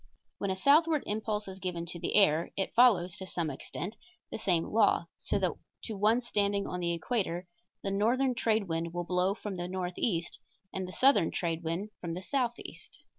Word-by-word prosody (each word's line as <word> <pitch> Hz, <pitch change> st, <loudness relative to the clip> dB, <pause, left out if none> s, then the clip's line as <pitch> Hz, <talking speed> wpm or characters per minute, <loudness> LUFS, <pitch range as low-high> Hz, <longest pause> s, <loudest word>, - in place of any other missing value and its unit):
When 200 Hz, -, -1 dB
a 190 Hz, -, 0 dB
southward 300 Hz, -, +4 dB
impulse 215 Hz, 0 st, -2 dB
is 190 Hz, 0 st, -8 dB
given 180 Hz, -3 st, -3 dB
to 170 Hz, 0 st, -3 dB
the -, -, -1 dB
air 170 Hz, -5 st, +5 dB
it 195 Hz, -, -1 dB
follows, 200 Hz, -7 st, +4 dB
to 190 Hz, -, -6 dB
some 170 Hz, -4 st, -2 dB
extent, 180 Hz, -, -6 dB, 0.3 s
the -, -, -4 dB
same 175 Hz, -6 st, +2 dB
law, 205 Hz, -4 st, +3 dB
so -, -, 0 dB
that -, -, +1 dB, 0.3 s
to 220 Hz, -, -4 dB
one 215 Hz, +5 st, +3 dB
standing 200 Hz, -4 st, 0 dB
on 180 Hz, -, -4 dB
the 170 Hz, -1 st, 0 dB
equator 180 Hz, -1 st, -1 dB, 0.4 s
the 195 Hz, -, -1 dB
northern 245 Hz, +6 st, +2 dB
trade 220 Hz, -4 st, +1 dB
wind 165 Hz, +1 st, -3 dB
will 175 Hz, -, -1 dB
blow 180 Hz, +2 st, +1 dB
from 205 Hz, -3 st, -6 dB
the 175 Hz, 0 st, -3 dB
northeast 180 Hz, -1 st, -2 dB, 0.3 s
and 190 Hz, -1 st, -3 dB
the -, -, -7 dB
southern 255 Hz, -7 st, +4 dB
trade 165 Hz, -2 st, -2 dB
wind 170 Hz, +6 st, -3 dB
from 165 Hz, -2 st, -4 dB
the 180 Hz, -, -5 dB
southeast. 245 Hz, 0 st, -3 dB
190 Hz, 190 wpm, -30 LUFS, 175-220 Hz, 0.4 s, air